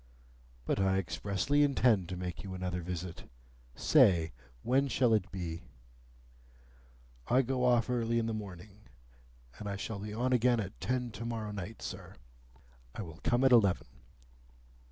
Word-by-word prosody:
"But - - 0
I 95 0 +2
expressly 95 - 0
intend 125 - +3
to 90 - -4
make 90 -2 -5
you 95 -1 -6
another 90 -1 -3
visit. 90 0 -6 0.5
Say, 95 - +4 0.3
when 135 +3 +2
shall 125 -2 +2
it 100 -5 +1
be?" 85 -3 -5 1.7
"I 130 +2 +4
go 130 0 -1
off 120 -2 +3
early 115 -2 0
in 115 - +1
the 115 - -2
morning, 105 0 -9 0.7
and 105 - -5
I 100 - -2
shall 100 +1 -5
be 105 +1 -6
on 125 +4 0
again 125 -1 +3
at 100 -2 -6
ten 125 -1 -1
to 110 - -7
morrow 115 -2 -3
night, 105 +2 -7
sir." - - -7 0.8
"I 110 - -4
will 80 -2 -10
come 120 +2 +2
at 135 - +5
eleven." 105 -7 +4
105 Hz, 155 wpm, -32 LUFS, 95-120 Hz, 1.7 s, at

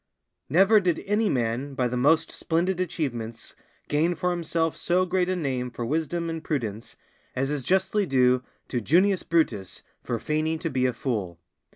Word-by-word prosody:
_ - - -53 0.5
Never 195 +8 +6
did 180 -4 0
any 210 +1 +1
man 125 +3 -1
by 125 -2 +1
the 125 - -3
most 160 +6 +3
splendid 175 +3 0
achievements 125 -11 -3 0.3
gain 160 +4 +1
for 180 +2 0
himself 165 -2 -1
so 180 +1 +1
great 180 0 0
a 185 - +1
name 130 -7 -2
for 120 -1 -5
wisdom 165 +5 -1
and 165 -1 -4
prudence 115 -9 -3 0.4
as 135 +2 0
is 145 -2 -1
justly 190 +6 +1
due 125 -2 +3 0.3
to 125 - -2
Junius 185 - +3
Brutus 120 - -1 0.2
for 120 - -2
feigning 155 +6 -1
to 160 0 -3
be 130 0 +2
a 125 - -1
fool. 105 -9 -3
155 Hz, 175 wpm, -26 LUFS, 125-175 Hz, 0.5 s, Never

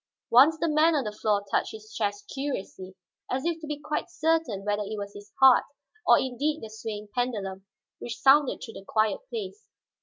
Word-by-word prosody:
Once 280 +7 +7
the 335 - 0
man 310 +1 +4
on 280 - +1
the 210 - -3
floor 210 -1 0
touched - - 0
his 215 0 -11
chest 205 -2 -2
curiously, 195 -9 -5 0.3
as 260 +3 -2
if 335 -1 -1
to 310 - -7
be 295 -1 -3
quite 300 +2 -3
certain 320 - 0
whether 205 0 0
it 210 +1 -4
was 200 0 -6
his 205 0 -12
heart, 265 -2 +7 0.4
or - - +8
indeed 285 +4 -1
the 220 - -7
swaying 215 -1 -6
pendulum 200 -6 -3 0.3
which 235 -1 -6
sounded 270 +2 +5
through 225 - -10
the - - -10
quiet 215 -1 +1
place. 430 -1 -6
240 Hz, 190 wpm, -27 LUFS, 210-300 Hz, 0.4 s, or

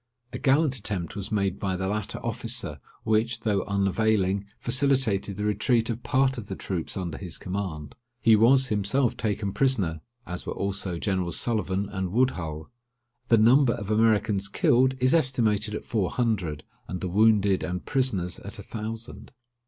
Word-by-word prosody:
A - - -4
gallant 140 0 +3
attempt 100 -5 -4
was 100 0 -5
made 100 -2 0
by 95 -2 -1
the 95 +1 -2
latter 105 0 -3
officer, - - -3 0.2
which, 110 +2 +1
though 105 -3 +1
unavailing, 100 0 +1
facilitated 125 -7 +1
the 105 - -3
retreat 115 +3 +1
of 115 +1 -5
part 130 0 +1
of 105 - -9
the 95 - -5
troops 90 -2 -4
under 90 -4 -4
his 90 -4 -6
command. 90 -7 -5 0.3
He 115 -2 +5
was 130 +4 +4
himself 110 +5 +1
taken 105 -2 -2
prisoner, 100 - +1 0.2
as 90 +1 -5
were - - -5
also 95 -2 -2
Generals 95 -1 0
Sullivan 100 -4 0
and 95 -2 -4
Woodhull. 85 - -1 0.6
The 115 - +5
number 120 +3 +5
of 100 0 -5
Americans 105 -2 +2
killed 130 +6 +3
is 130 +1 +3
estimated 110 -8 +2
at - - -6
four 105 -6 0
hundred, 95 - -1 0.2
and 90 - -4
the 95 - -3
wounded 100 0 +3
and 90 0 -4
prisoners 105 -11 -1
at - - -8
a - - -8
thousand. 115 +1 -7
105 Hz, 160 wpm, -26 LUFS, 95-115 Hz, 0.6 s, He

